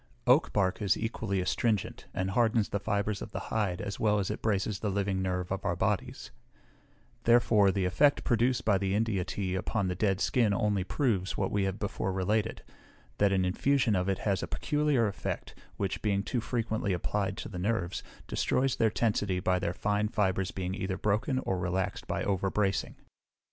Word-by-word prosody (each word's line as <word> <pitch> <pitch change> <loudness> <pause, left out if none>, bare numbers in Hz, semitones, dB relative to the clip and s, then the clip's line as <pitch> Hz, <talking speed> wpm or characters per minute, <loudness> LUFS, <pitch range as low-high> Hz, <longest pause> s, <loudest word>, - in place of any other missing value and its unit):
Oak 130 +5 +4
bark 95 -2 +1
is 100 -2 +2
equally 105 -4 -2
astringent, 105 +2 -1
and 95 +1 -2
hardens 115 -1 +2
the 100 - -1
fibres 100 0 -1
of - - -6
the - - -4
hide, 100 -5 0
as 100 -1 -5
well 105 -1 +3
as 100 0 -1
it 105 - -5
braces 100 -1 0
the 105 - -1
living 100 -1 0
nerve 90 -1 -2
of 95 0 -2
our 85 - 0
bodies; - - -2 0.9
therefore 115 -4 +5
the 95 -1 0
effect 140 +11 +3
produced 120 +1 +1
by 100 -3 +3
the 100 0 0
India 105 -4 +1
tea 95 0 -3
upon 95 +1 -1
the 90 - -2
dead 95 0 +1
skin 110 -2 +2
only 105 -4 +1
proves, 100 -4 0
what - - 0
we 100 -1 +1
have 95 0 -2
before 100 -2 -2
related, 100 +3 -1 0.6
that 100 -1 +4
an 95 -1 +2
infusion 125 +4 +2
of 90 +1 0
it 95 - +1
has 100 -3 0
a - - -3
peculiar 150 -5 +1
effect, 100 - -4 0.2
which, 100 -2 -2
being 100 -2 +1
too 120 +3 -2
frequently 110 -4 -1
applied 95 +3 -1
to - - -5
the 90 - -6
nerves, 95 -2 -1 0.3
destroys 135 -1 +1
their 110 - +3
tensity 105 -4 0
by 90 0 +1
their 90 -2 -1
fine 105 +3 0
fibres 95 -3 0
being 95 -1 -3
either 95 -1 -3
broken 105 +6 0
or 95 -8 -1
relaxed 90 +1 -2
by - - -2
overbracing. 95 0 0
100 Hz, 185 wpm, -30 LUFS, 95-110 Hz, 0.9 s, therefore